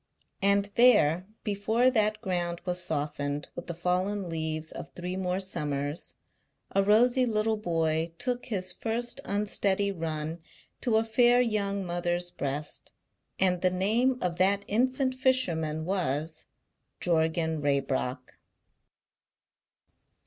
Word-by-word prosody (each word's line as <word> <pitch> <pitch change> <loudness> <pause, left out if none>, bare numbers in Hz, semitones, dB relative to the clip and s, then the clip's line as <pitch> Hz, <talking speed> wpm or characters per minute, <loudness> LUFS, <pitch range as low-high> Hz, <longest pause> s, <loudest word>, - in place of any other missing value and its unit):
And 200 +1 +2
there, 190 -8 +5 0.2
before 220 +5 +2
that 215 -2 +1
ground 175 -4 -2
was 180 0 +1
softened 145 -2 -2
with 175 - -8
the 170 - -4
fallen 180 +2 -1
leaves 160 -1 -2
of - - -8
three 180 +1 -4
more 185 0 -1
summers, 145 -5 -2 0.6
a 195 - +3
rosy 240 +6 +4
little 220 0 +1
boy 165 -4 0
took 245 +3 -2
his 185 -6 0
first 240 +4 -2
unsteady 200 -1 +1
run 160 -2 -4 0.4
to 230 -4 +2
a 220 - +3
fair 240 +2 +4
young 200 -5 0
mother's 175 0 -1
breast, 145 0 -4 0.5
and 180 -2 +2
the 185 - +4
name 220 +8 +1
of 175 -1 -2
that 200 +2 +3
infant 260 +4 +1
fisherman 170 -13 +1
was 160 -4 -1 0.5
Jorgan 160 -1 +1
Raybrock. 135 -2 -1
185 Hz, 120 wpm, -28 LUFS, 160-215 Hz, 0.6 s, there